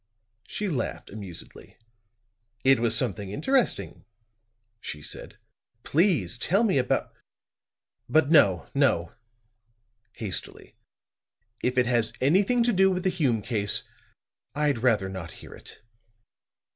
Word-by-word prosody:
She 210 - -4
laughed 140 -10 -4
amusedly. 100 -5 -10 0.9
"It 135 -1 +5
was 115 -1 +5
something 105 -5 +1
interesting," 245 - 0 0.8
she 75 - -7
said. - - -7 0.5
"Please 145 - +1
tell 195 - +2
me 195 -11 +2
about 125 - -1 1.0
but, 155 -1 +3
no, 95 - +4
no," 85 0 +1 1.0
hastily. 105 -5 -5 0.9
"If 125 +1 -1
it 125 - +4
has 120 -2 +1
anything 195 - +3
to 240 0 +1
do 190 0 +4
with 180 -1 -2
the 185 - +1
Hume 130 - 0
case, 105 -4 0 0.7
I'd 145 -4 +1
rather 110 -5 +2
not 95 -3 -7
hear - - -13
it." - - -14
125 Hz, 115 wpm, -26 LUFS, 105-175 Hz, 1.0 s, It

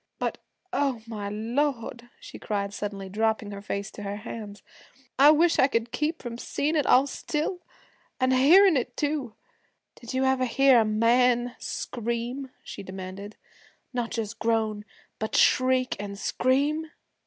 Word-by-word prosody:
But, - - -3 0.3
oh, 265 -4 0
my 210 -3 -5
Lord!' 235 +2 -2
she - - -11
cried 200 -1 -3
suddenly, 200 -1 -5
dropping 220 +1 -1
her 200 0 -7
face 200 0 -4
to - - -10
her 200 0 -4
hands, 210 -2 -8 0.6
'I 285 +2 +9
wish 325 +2 +4
I 265 - +6
could 230 -3 -1
keep 310 +2 -2
from 240 -1 -6
seein' 300 +5 -1
it 295 -4 +1
all 260 +2 +6
still 305 +5 -3 0.6
an' 255 0 +2
hearin' 325 +8 +6
it 250 - -3
too! 290 -6 -2 0.6
Did 240 +2 -8
you 260 +1 +2
ever 265 -1 +2
hear 265 +1 +5
a 225 - +3
man 240 +3 +2
scream?' 240 +3 -4
she - - -8
demanded. 190 +2 -8 0.6
'Not 240 -2 -2
just 225 0 -4
groan, 220 -2 0 0.3
but 220 - -3
shriek, 255 0 +3
an' 200 -1 -6
scream?' 285 +9 0
235 Hz, 150 wpm, -26 LUFS, 215-270 Hz, 0.6 s, I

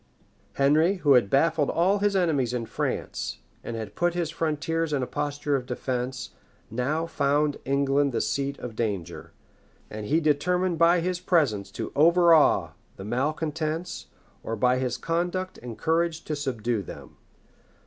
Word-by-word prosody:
] - - -37
Henry, 155 +7 +3
who 150 -7 +3
had 120 -6 +4
baffled 155 +2 +2
all 190 +4 +2
his 205 0 +1
enemies 145 -10 +1
in 115 -2 -2
France, - - -3 0.3
and 115 - -5
had 110 -2 -6
put 175 +5 0
his 170 -3 -1
frontiers 165 0 -1
in 135 -3 0
a - - 0
posture 145 +1 -2
of 125 -2 -3
defence, 125 0 -3 0.4
now 140 +8 -1
found 145 -2 0
England 140 +1 +2
the 120 - -1
seat 140 0 -1
of 120 -3 -7
danger; 100 -7 -4 0.6
and 105 -1 -6
he 155 +7 +3
determined 170 +3 +1
by 170 +1 +5
his 180 +1 -1
presence 140 - +1
to - - -6
overawe 170 0 +5 0.2
the 95 - -9
malecontents, 155 +7 -2 0.3
or 115 - -4
by 125 +3 +2
his 125 -2 -1
conduct 175 +3 -2
and 120 -2 -8
courage 165 0 0
to 155 - -3
subdue 120 -6 -2
them. 95 - -11
145 Hz, 155 wpm, -26 LUFS, 125-165 Hz, 0.6 s, by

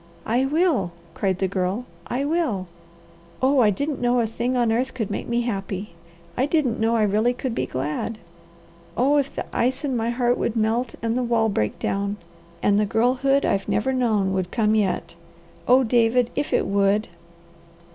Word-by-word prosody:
"I 250 +4 +1
will!" 295 - +1 0.2
cried 190 -2 -1
the 190 - 0
Girl. 190 +5 -2 0.2
"I 265 +3 -1
will! 285 - -1 0.7
Oh 265 +1 +3
I 220 -4 +5
didn't 285 +7 -2
know 245 0 +2
a 235 - +2
thing 240 +3 -2
on 235 -2 +2
earth 255 +4 -1
could 220 -5 -3
make - - -4
me 235 0 +1
happy! 195 -4 -4 0.4
I 260 - +1
didn't 290 -7 +1
know 225 +1 +2
I 220 - +3
really 215 +4 +2
could 255 -1 -3
be - - -2
glad. 150 - -3 0.8
Oh 275 +4 +3
if 280 -1 0
the - - -5
ice 260 +4 0
in 265 -3 -1
my 230 0 0
heart 245 0 +1
would 235 - -1
melt, 230 +2 0
and 230 0 0
the 255 - +1
wall 230 -2 +2
break 105 - -1
down, 200 +1 -2 0.5
and 205 0 +3
the 210 - +2
girlhood 255 +5 +2
I've 195 0 0
never 265 +5 +1
known 215 -7 +1
would 185 -1 -1
come 215 -1 +1
yet! 205 -6 0 0.5
Oh 255 +2 +6
David, 240 +1 +2
if 290 - -2
it - - +2
would!" 200 +2 +2
230 Hz, 185 wpm, -23 LUFS, 205-255 Hz, 0.8 s, Oh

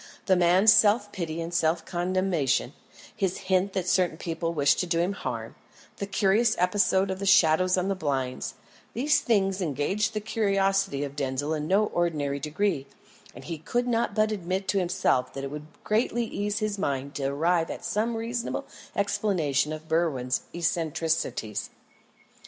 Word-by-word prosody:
The 190 - +4
man's 180 +5 +6
self 210 -1 +4
pity 165 -3 -4
and 165 +1 -5
self 165 0 +1
condemnation; 175 -5 0 0.4
his 190 -2 -1
hints 190 0 0
that 185 -2 -1
certain 180 -3 +2
people 165 0 -3
wished 145 -4 +2
to 180 - -1
do 170 -1 0
him 175 +4 +1
harm; - - -5 0.4
the 200 - -4
curious 205 +3 +2
episode 190 +1 +2
of 190 - -4
the 200 - -3
shadows 185 0 +5
on 180 +1 0
the 195 - +1
blind 135 -8 -2 0.4
these 285 +5 +3
things 195 -4 +1
engaged 185 - -1
the - - +1
curiosity 195 -7 0
of 140 -1 -6
Denzil 140 +2 -2
in 150 -1 -3
no 200 +4 +3
ordinary 150 -7 -1
degree; 150 -1 -1 0.5
and - - -10
he 165 -3 -6
could 245 +10 -1
not 230 -3 0
but 215 0 +2
admit 190 -1 -3
to 200 - +2
himself 175 -8 +1
that 135 - -5
it 140 - -4
would 150 0 -7 0.2
greatly 235 +2 +1
ease 205 -1 -3
his 210 -1 -2
mind 140 -5 -2
to 140 - -3
arrive 165 +5 +1
at - - -6
some 225 +2 -1
reasonable 235 +1 -3 0.3
explanation 170 -8 0
of 155 0 -7
Berwin's 155 -7 0
eccentricities. 160 - -1
180 Hz, 165 wpm, -27 LUFS, 155-200 Hz, 0.5 s, man's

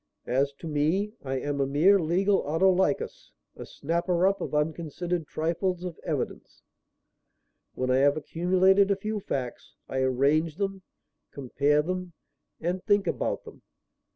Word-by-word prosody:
As 135 +3 +1
to 155 +4 -9
me, 160 +8 0
I 135 -1 -3
am 140 +1 -2
a 135 - +1
mere 170 +9 +4
legal 190 +4 +2
Autolycus, 190 - +1 0.3
a - - -9
snapper 170 +3 0
up 195 +1 +2
of - - -3
unconsidered 160 +2 -2
trifles 175 +3 -1
of 180 -3 -6
evidence. - - -4 1.1
When 130 0 -1
I 130 - +4
have 140 +2 +4
accumulated 185 +5 +3
a 200 - +3
few 215 +2 -3
facts, 130 -10 -5
I 130 - -2
arrange 140 +5 +2
them, 195 0 -3 0.5
compare 145 +2 +1
them 180 +1 -4 0.5
and 180 +2 -2
think 205 -2 +3
about - - -2
them. - - -13
170 Hz, 140 wpm, -27 LUFS, 145-190 Hz, 1.1 s, mere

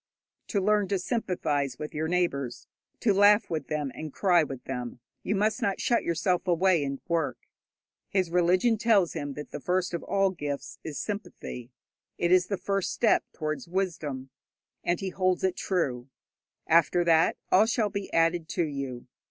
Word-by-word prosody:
To 205 - 0
learn 205 +1 +2
to 200 +1 0
sympathize 160 - -1
with 150 - -6
your 155 +1 -1
neighbours, 150 -8 -1 0.4
to 210 - +3
laugh 205 +1 +5
with 160 -2 -2
them 150 -3 -2
and 155 -1 -7
cry 180 +2 +3
with 135 -4 -7
them, 125 -2 -5 0.2
you - - -1
must 210 +1 +1
not 195 - 0
shut 235 - +1
yourself 175 +3 0
away 175 -2 +3
and 140 -1 -3
work. 160 -8 0 0.7
His 185 -4 0
religion 180 +6 +3
tells 210 -7 +3
him 145 -1 -4
that 150 - -8
the - - -5
first 180 +3 -1
of 170 - -2
all 195 0 +1
gifts 145 -5 -5
is 155 -3 -5
sympathy; 200 - -6 0.5
it 175 - +1
is 180 0 +5
the 200 - -2
first 195 +1 -1
step 230 - +2
towards 155 0 -4
wisdom, 160 -8 -3 0.5
and 175 - 0
he 195 - -3
holds 185 -1 0
it 190 -1 +1
true. 135 -9 -1 0.6
After 170 +2 +4
that, 165 -1 +3
all 205 +4 +6
shall 225 -3 +1
be 200 -1 -4
added 165 0 +2
to 175 - +2
you. 140 -5 -5
175 Hz, 170 wpm, -28 LUFS, 150-195 Hz, 0.7 s, all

